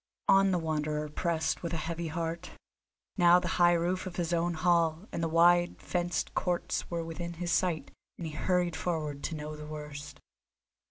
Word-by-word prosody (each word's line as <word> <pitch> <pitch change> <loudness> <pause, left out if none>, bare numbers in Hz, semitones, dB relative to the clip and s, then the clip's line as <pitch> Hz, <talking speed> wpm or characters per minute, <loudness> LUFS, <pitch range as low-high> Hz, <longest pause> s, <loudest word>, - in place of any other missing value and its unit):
On 195 0 +6
the 185 - +2
Wanderer 150 -2 -1
pressed 160 +1 -1
with 170 -1 -4
a 160 - -3
heavy 170 0 -3
heart; 165 +1 -3 0.7
now 175 -1 +7
the - - -4
high 175 0 +7
roof 175 +2 0
of 180 - -7
his 175 -1 -1
own 170 0 +1
hall 170 +2 +2
and - - -3
the 165 - +1
wide 175 +2 +4
fenced 175 -2 -2
courts 175 -1 -1
were 170 -1 -2
within 170 +1 -5
his 170 +1 -3
sight, 170 -6 0 0.3
and 170 - -5
he 155 - -5
hurried 175 +1 +1
forward 155 -5 -3
to 165 - -3
know 150 0 -5
the 150 0 -9
worst. 150 -2 -8
170 Hz, 180 wpm, -30 LUFS, 155-175 Hz, 0.7 s, now